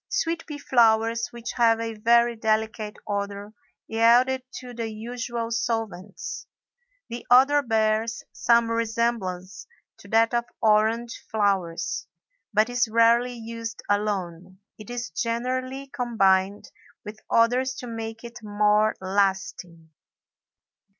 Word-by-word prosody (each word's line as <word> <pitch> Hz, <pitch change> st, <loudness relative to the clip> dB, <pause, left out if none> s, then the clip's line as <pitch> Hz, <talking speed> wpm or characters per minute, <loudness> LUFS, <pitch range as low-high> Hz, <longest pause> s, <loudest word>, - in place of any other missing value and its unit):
Sweet 335 Hz, -5 st, -2 dB
pea 300 Hz, -2 st, -6 dB
flowers, 230 Hz, -3 st, +2 dB
which 235 Hz, 0 st, -7 dB
have 230 Hz, -2 st, +4 dB
a 230 Hz, 0 st, -3 dB
very 235 Hz, +2 st, +3 dB
delicate 220 Hz, -1 st, -1 dB
odor, 200 Hz, 0 st, -4 dB, 0.3 s
yield 230 Hz, +3 st, +4 dB
it 260 Hz, -1 st, -4 dB
to 250 Hz, -1 st, -8 dB
the 230 Hz, -1 st, -4 dB
usual 230 Hz, +1 st, -5 dB
solvents. 225 Hz, -5 st, -4 dB, 0.6 s
The 235 Hz, +1 st, -6 dB
odor 270 Hz, +4 st, +6 dB
bears 225 Hz, -2 st, 0 dB
some 230 Hz, +2 st, +2 dB
resemblance 225 Hz, -5 st, -2 dB, 0.3 s
to -, -, -14 dB
that 225 Hz, +1 st, +3 dB
of 235 Hz, 0 st, +1 dB
orange 220 Hz, +2 st, +1 dB
flowers, 195 Hz, -6 st, -1 dB, 0.4 s
but 215 Hz, 0 st, +3 dB
is 245 Hz, -1 st, +1 dB
rarely 230 Hz, +2 st, +3 dB
used 230 Hz, 0 st, -7 dB
alone; 190 Hz, -3 st, -2 dB, 0.2 s
it 215 Hz, -, -11 dB
is 245 Hz, -4 st, -5 dB
generally 255 Hz, +7 st, -2 dB
combined 205 Hz, -7 st, +1 dB, 0.3 s
with 210 Hz, +1 st, -8 dB
others 250 Hz, +3 st, +2 dB
to -, -, -7 dB
make 225 Hz, -1 st, -6 dB
it 235 Hz, +1 st, -9 dB
more 210 Hz, 0 st, +2 dB
lasting. 190 Hz, -4 st, -2 dB
225 Hz, 115 wpm, -25 LUFS, 210-240 Hz, 0.6 s, odor